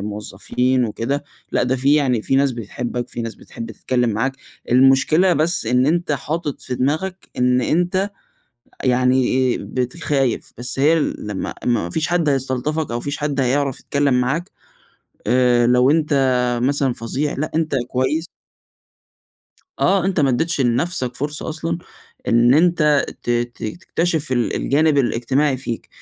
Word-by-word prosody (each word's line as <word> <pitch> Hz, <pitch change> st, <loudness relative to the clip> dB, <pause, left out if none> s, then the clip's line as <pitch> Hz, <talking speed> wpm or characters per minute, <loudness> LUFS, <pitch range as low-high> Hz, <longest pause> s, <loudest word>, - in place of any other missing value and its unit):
موظفين 120 Hz, +5 st, -1 dB
وكده، 125 Hz, +6 st, -2 dB, 0.3 s
لأ -, -, +2 dB
ده 130 Hz, +1 st, +1 dB
في 135 Hz, +3 st, +3 dB
يعني، 130 Hz, -7 st, +2 dB
في 135 Hz, -, +1 dB
ناس 140 Hz, -1 st, +3 dB
بتحبك، 120 Hz, +2 st, -5 dB
في 120 Hz, -, -5 dB
ناس 115 Hz, -1 st, -5 dB
بتحب 115 Hz, 0 st, -9 dB
تتكلّم 125 Hz, +1 st, -1 dB
معاك. 130 Hz, +6 st, -1 dB, 0.3 s
المشكلة 135 Hz, +8 st, +4 dB
بس 160 Hz, -4 st, +1 dB
إن 125 Hz, +2 st, +3 dB
أنت 170 Hz, 0 st, +1 dB
حاطط 150 Hz, +1 st, -3 dB
في 125 Hz, -, -4 dB
دماغك، 160 Hz, +9 st, -2 dB
إن 125 Hz, 0 st, +3 dB
أنت 180 Hz, +8 st, 0 dB, 0.7 s
يعني 130 Hz, 0 st, +3 dB
إيه، 130 Hz, -1 st, +1 dB
بقيت 125 Hz, +3 st, -3 dB
خايف. 135 Hz, -5 st, 0 dB
بس 125 Hz, +3 st, -2 dB
هي 155 Hz, +4 st, +4 dB
لمّا 105 Hz, -9 st, -3 dB
ما 110 Hz, -8 st, +1 dB
فيش 155 Hz, -, 0 dB
حَد 170 Hz, -4 st, +1 dB
هيستلطفك 135 Hz, +2 st, -1 dB
أو -, -, -2 dB
ما -, -, -6 dB
فيش 145 Hz, 0 st, -3 dB
حَد 145 Hz, -2 st, -2 dB
هيعرف 135 Hz, +1 st, 0 dB
يتكلّم 140 Hz, -2 st, 0 dB
معاك، 150 Hz, +8 st, -2 dB, 0.8 s
آآ، 125 Hz, -1 st, +3 dB
لو 125 Hz, +2 st, +4 dB
أنت 155 Hz, -1 st, +1 dB, 0.5 s
مثلًا 135 Hz, 0 st, +1 dB
فظيع، 130 Hz, +6 st, -3 dB
لأ 155 Hz, -, -2 dB
أنت 160 Hz, -2 st, 0 dB
كويس 130 Hz, +6 st, 0 dB, 1.6 s
آه، 190 Hz, -1 st, +3 dB
أنت 190 Hz, -4 st, +1 dB
ما 140 Hz, -, +3 dB
أدّيتش 165 Hz, +6 st, 0 dB
لنفسك 125 Hz, +1 st, 0 dB
فرصة 145 Hz, +2 st, -4 dB
أصلًا 165 Hz, +2 st, -3 dB, 0.5 s
إن 120 Hz, +2 st, +5 dB
أنت 155 Hz, -3 st, +3 dB, 0.2 s
ت 120 Hz, -, -3 dB
ت 120 Hz, 0 st, -2 dB
تكتشف 165 Hz, +2 st, -1 dB
ال 120 Hz, -2 st, 0 dB
الجانب 150 Hz, +1 st, +2 dB
الاجتماعي 135 Hz, +3 st, +1 dB
فيك. 120 Hz, -3 st, -5 dB
135 Hz, 150 wpm, -20 LUFS, 125-155 Hz, 1.6 s, إن